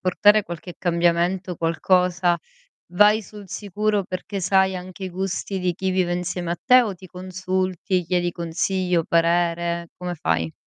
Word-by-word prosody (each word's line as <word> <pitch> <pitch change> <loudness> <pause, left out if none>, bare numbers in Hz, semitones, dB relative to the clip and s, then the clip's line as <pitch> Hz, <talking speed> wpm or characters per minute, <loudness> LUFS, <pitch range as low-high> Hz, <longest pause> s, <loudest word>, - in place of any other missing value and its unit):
portare 205 +3 +4
qualche 175 +1 -8
cambiamento, 175 +1 +1
qualcosa, 175 +1 +2 0.5
vai 210 +4 +5
sul 205 +1 -11
sicuro 210 +1 -1
perché 195 +2 -5
sai 190 +1 +3
anche 185 +1 -7
i - - -3
gusti 190 +1 -3
di 180 -1 0
chi 190 +2 -2
vive 185 -1 +1
insieme 175 -1 -3
a 175 - -2
te, 255 0 +6
o 210 -4 -3
ti 185 +1 -13
consulti 185 0 -2
chiedi 175 0 0
consiglio, 175 +1 0
o - - -5
parere, 170 0 +1
come 180 -1 -4
fai? 80 - -1
180 Hz, 150 wpm, -23 LUFS, 170-190 Hz, 0.5 s, te